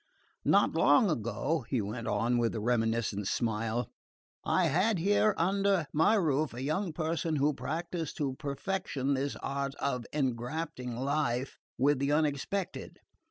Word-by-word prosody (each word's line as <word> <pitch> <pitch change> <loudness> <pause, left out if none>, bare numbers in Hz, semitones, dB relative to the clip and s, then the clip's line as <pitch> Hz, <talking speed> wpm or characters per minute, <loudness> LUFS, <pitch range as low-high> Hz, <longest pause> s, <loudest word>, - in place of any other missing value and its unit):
Not - - +4
long 215 -8 +4
ago," 120 +5 -1
he 130 - +1
went 110 +3 -4
on, 115 +4 +1
with 115 -1 0
a - - -1
reminiscent 115 -3 0
smile, 115 +1 -1 0.5
"I - - +2
had 190 +8 +2
here 205 +4 +3
under 195 0 +2
my 160 +8 +4
roof 155 - +1
a 125 - -5
young 165 +6 -1
person 160 0 -1
who 145 +1 +2
practised 160 +5 -4
to 140 -3 -1
perfection 140 -1 -2
this 135 +1 -1
art 140 0 -2
of 125 -5 -2
engrafting 125 -1 -2
life 135 -1 -1 0.2
with 140 +2 +3
the 140 +1 +1
unexpected. 155 +6 -1
140 Hz, 140 wpm, -31 LUFS, 120-165 Hz, 0.5 s, Not